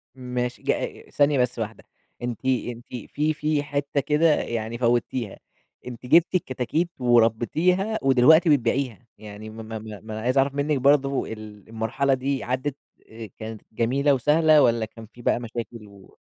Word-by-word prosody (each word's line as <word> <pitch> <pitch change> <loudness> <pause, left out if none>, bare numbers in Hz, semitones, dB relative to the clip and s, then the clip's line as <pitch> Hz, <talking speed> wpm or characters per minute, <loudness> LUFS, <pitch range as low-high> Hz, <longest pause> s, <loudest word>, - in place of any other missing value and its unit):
ماشي 125 -1 -4
ج - - +2
آآ، - - -4
ثانية 145 -2 +3
بس 125 -1 0
واحدة 110 0 -5 0.4
أنتِ، 120 +1 -5
أنتِ 120 -2 -1 0.3
في 155 +1 +1
في 150 -1 -1
حتة 140 0 -2
كده 150 +3 +3
يعني 115 0 -3
فوّتيها، 120 -2 0 0.5
أنتِ 125 0 -8
جبتِ 170 +7 +4
الكتاكيت 155 +2 -1
وربيتيها، 125 - +2
ودلوقتي 135 +6 +5
بتبيعيها، 125 -3 +1
يعني 105 0 -10
ما 110 +1 -9
ما 110 0 -6
ما 105 -1 -9
ما 110 -1 -7
أنا 110 - -5
عايز 125 +3 0
أعرف 135 +1 +3
منِّك 145 0 0
برضه 135 0 +2
ال 110 -1 -10
المرحلة 115 +5 0
دي 135 +1 -1
عدّت 130 +3 -2 0.3
آآ 110 -2 -9
كانت 110 -1 -7
جميلة 135 +6 +1
وسهلة، 150 +3 +4
والَّا 115 -2 +3
كان 110 +1 -12
في 120 - -13
بقى 120 - +1
مشاكل 115 -2 -7
و 100 -1 -18
125 Hz, 160 wpm, -24 LUFS, 115-140 Hz, 0.5 s, ودلوقتي